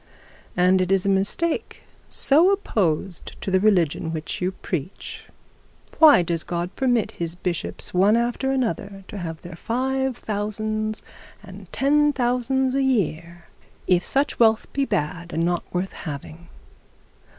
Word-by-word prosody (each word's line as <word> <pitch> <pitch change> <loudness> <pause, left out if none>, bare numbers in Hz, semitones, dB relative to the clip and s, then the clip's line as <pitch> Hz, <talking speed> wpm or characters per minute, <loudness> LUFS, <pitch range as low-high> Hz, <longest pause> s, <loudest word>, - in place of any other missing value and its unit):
And 185 +1 +4
it 185 +1 0
is 195 0 +3
a - - +2
mistake 200 +13 -1 0.3
so 315 +7 +4
opposed 195 - -1
to 195 - -4
the 190 - +4
religion 175 -6 +2
which 160 +1 -4
you 180 +1 0
preach! 180 -2 -6 0.7
Why 300 - +8
does 170 -1 -1
God 175 +1 -4
permit 245 -5 +1
his 170 0 -3
bishops 175 -2 -3
one 200 +5 +4
after 245 +3 0
the 260 - +2
other 195 0 -5
to 205 - -6
have 165 -3 -6
their 175 -1 -8
five 265 +5 -1
thousands 215 +1 -3 0.4
and - - -12
ten 295 +2 +3
thousands 255 +1 +1
a 275 - +1
year 175 - -1 0.4
if 180 -1 +3
such 275 +2 0
wealth 220 -1 +4
be 275 0 +1
bad 170 - -3
and 165 +1 +1
not 175 0 -1
worth 180 +2 -2
having? 160 +1 -8
200 Hz, 145 wpm, -23 LUFS, 175-250 Hz, 0.7 s, Why